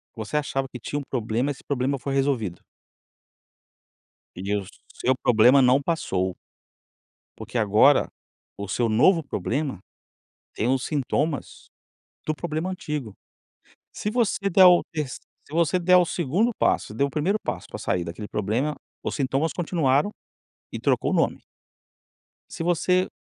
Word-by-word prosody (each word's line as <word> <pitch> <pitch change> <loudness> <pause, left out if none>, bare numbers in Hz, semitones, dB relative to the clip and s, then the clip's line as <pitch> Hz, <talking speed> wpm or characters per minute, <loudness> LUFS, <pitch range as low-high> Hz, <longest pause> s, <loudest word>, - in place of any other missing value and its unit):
você 110 +6 -3
achava 135 -2 -1
que 125 - -7
tinha 145 +5 -3
um - - -5
problema 120 +1 -1
esse 140 - -6
problema 140 0 -1
foi 135 +1 -4
resolvido". 135 -10 0 1.8
E 95 +3 -2
o 100 - -3 0.4
seu 130 - +3
problema 125 +3 +5
não 125 +3 +4
passou 95 - -1 1.0
porque - - -7
agora 110 +6 +4 0.5
o 100 - -4
seu 115 +5 0
novo 160 - +4
problema 135 - -3 0.8
tem 115 - -1
os 130 0 +1
sintomas 145 0 -2 0.6
do 155 - 0
problema 160 +2 -3
antigo. 150 - -5 0.8
Se 210 - -3
você 215 -4 0
der 190 0 +7
o 180 -1 +7
terc 150 -5 -3 0.4
se - - -14
você 170 +1 +2
der 180 +1 +5
o 180 - +4
2º 175 - 0
passo, - - +1
você 105 - -10
deu 140 - +2
o - - -10
1º 175 +9 +1
passo - - -4
para - - -7
sair 90 -1 -1
daquele 85 +5 -7
problema, 115 +10 -1 0.3
os - - -2
sintomas 140 +3 0
continuaram 160 -2 +1 0.6
e - - -5
trocou - - +1
o - - 0
nome - - +1 1.1
se 165 - -6
você 180 +2 +2
140 Hz, 145 wpm, -25 LUFS, 115-165 Hz, 1.8 s, der